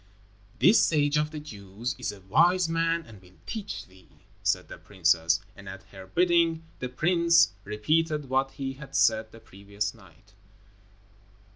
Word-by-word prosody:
"This 220 - +6
sage 145 -2 +2
of 150 0 +1
the 155 -1 -7
Jews 110 -2 -6
is 125 - -2
a 100 -1 -13
wise 170 - +3
man 165 0 0
and 105 -4 -14
will 90 0 -20
teach 210 -2 -6
thee," 95 -1 -21 0.3
said - - 0
the - - -10
princess, 85 -3 +1 0.2
and, 100 -1 -11
at 95 0 -9
her 95 -1 -11
bidding, 170 - +2 0.2
the 125 - -4
prince 170 - +3
repeated 150 +8 0
what 135 +1 +1
he 135 0 -4
had 135 +1 -11
said 110 -1 +2
the 115 - -13
previous 100 -1 -5
night. 95 -1 -20
125 Hz, 155 wpm, -27 LUFS, 100-165 Hz, 0.3 s, This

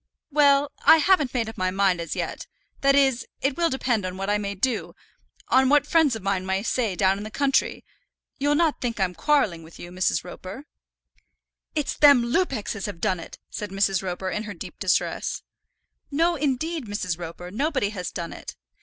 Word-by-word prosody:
"Well; 285 -1 +4
I 325 - +8
haven't 320 -2 +3
just - - -23
made 230 -3 0
up 220 - -8
my 185 0 +1
mind 190 -2 +1
as 165 - -4
yet. - - -4 0.3
That 275 0 +4
is, 265 -3 +2
it 270 0 0
will 340 -1 +2
depend 250 -6 0
on 185 0 -4
what 195 +1 -2
I 210 - +2
may 200 -1 -4
do, 235 +4 -1 0.5
on 260 0 +4
what 290 0 +4
friends 305 -5 +3
of 220 - -8
mine 195 -2 0
may 190 +1 -1
say 230 -4 0
down 190 +1 +2
in - - -6
the 215 - -6
country. 275 +4 0 0.5
You'll 290 +1 +2
not 320 -1 +1
think 235 -3 -2
I'm 185 -2 +1
quarrelling 215 - +1
with 160 +1 -14
you, 175 - -9
Mrs. 185 0 0
Roper." 185 +9 -9 1.1
"It's 300 -2 -1
them 285 -5 +6
Lupexes 255 - -1
as 195 - -4
have 200 -5 -7
done 190 -3 0
it," 165 - -10
said 210 - -5
Mrs. 195 -1 +1
Roper, 185 0 -3
in 210 - -3
her 205 -2 -7
deep - - -9
distress. - - 0 0.7
"No, 330 +4 +2
indeed, 295 0 -2
Mrs. 180 -5 -3
Roper, 175 +1 -7
nobody 260 - 0
has 180 -4 -4
done 170 -1 -6
it." - - -9
220 Hz, 200 wpm, -25 LUFS, 190-280 Hz, 1.1 s, I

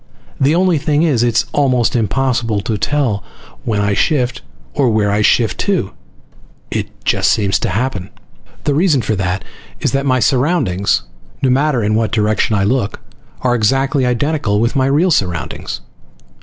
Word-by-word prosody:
The 140 +4 +3
only 180 -3 +2
thing 150 +2 +1
is, 140 -9 +2
it's 120 -1 +2
almost 130 -5 +2
impossible 115 -1 0
to 110 +1 -2
tell 115 -2 0 0.4
when 110 -3 0
I 100 0 +1
shift, 125 +2 0 0.3
or 135 -3 +2
where 105 -2 +1
I 105 +1 +1
shift 110 +1 +2
to. 190 - 0 0.8
It - - -2 0.2
just - - +2
seems 100 -2 +1
to - - -2
happen. 105 -5 -2 0.5
The 145 - +1
reason 150 -4 +2
for 110 - -1
that 95 0 -2 0.4
is - - 0
that 140 0 -1
my 130 -1 +3
surroundings, 125 - +1 0.4
no 130 - +3
matter 135 -2 +1
in 105 +1 +1
what 110 -2 0
direction 110 -1 +1
I 100 - +1
look, 110 0 0 0.4
are 125 -1 +1
exactly 135 +4 +1
identical 125 -3 0
with 115 +5 0
my 130 -1 +2
real 155 +7 +2
surroundings. 90 - -2
120 Hz, 160 wpm, -16 LUFS, 105-140 Hz, 0.8 s, The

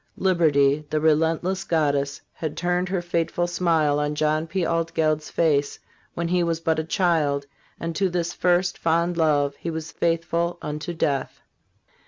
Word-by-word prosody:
Liberty, 150 -6 +3
the 155 - 0
relentless 165 +4 +1
goddess, 145 -5 0
had 155 -2 -5
turned 180 +1 0
her 185 -2 -1
fateful 175 0 -1
smile 165 -4 +1
on 150 0 -1
John 155 +1 0
P. 175 +2 -1
Altgeld's 160 -2 0
face 145 -4 +1 0.4
when 170 0 -2
he 180 0 +2
was 165 -1 0
but 160 -1 0
a - - -1
child, 160 -5 +1 0.3
and 165 0 -4
to 195 +1 +1
this 175 -1 -2
first, 180 0 +1
fond 170 +1 +1
love 145 -3 +2
he 170 - -5
was 160 -1 -5
faithful 170 +1 0
unto 150 +3 -5
death. 140 -4 -1
165 Hz, 155 wpm, -24 LUFS, 150-175 Hz, 0.4 s, Liberty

